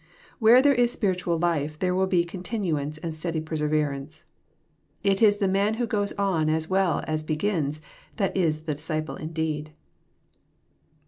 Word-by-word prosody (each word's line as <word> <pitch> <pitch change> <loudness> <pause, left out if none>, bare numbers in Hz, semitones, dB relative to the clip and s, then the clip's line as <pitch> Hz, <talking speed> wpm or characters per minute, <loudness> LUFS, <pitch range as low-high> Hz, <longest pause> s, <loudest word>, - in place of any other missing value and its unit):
Where 240 +3 +7
there 285 -1 +5
is 245 -2 +3
spiritual 180 -6 0
life 155 -3 0
there 180 +2 0
will 190 +1 +2
be 175 -2 +2
con 175 +1 -8
tinuance 160 -8 -2
and 165 -1 -3
steady 160 +1 -3
perseverance. 150 -1 -2 0.8
It 195 0 +2
is 205 -2 +5
the 200 -2 +1
man 200 +3 +1
who 240 +1 -1
goes 205 -2 -1
on 185 -6 +1
as 160 0 0
well 190 -3 +1
as 155 0 -2
begins, 155 -2 -1 0.4
that 195 -4 0
is 160 -5 +1
*^ - - -24
the 155 - -1
disciple 155 +1 -3
indeed." 155 -1 -3
170 Hz, 165 wpm, -26 LUFS, 155-195 Hz, 0.8 s, Where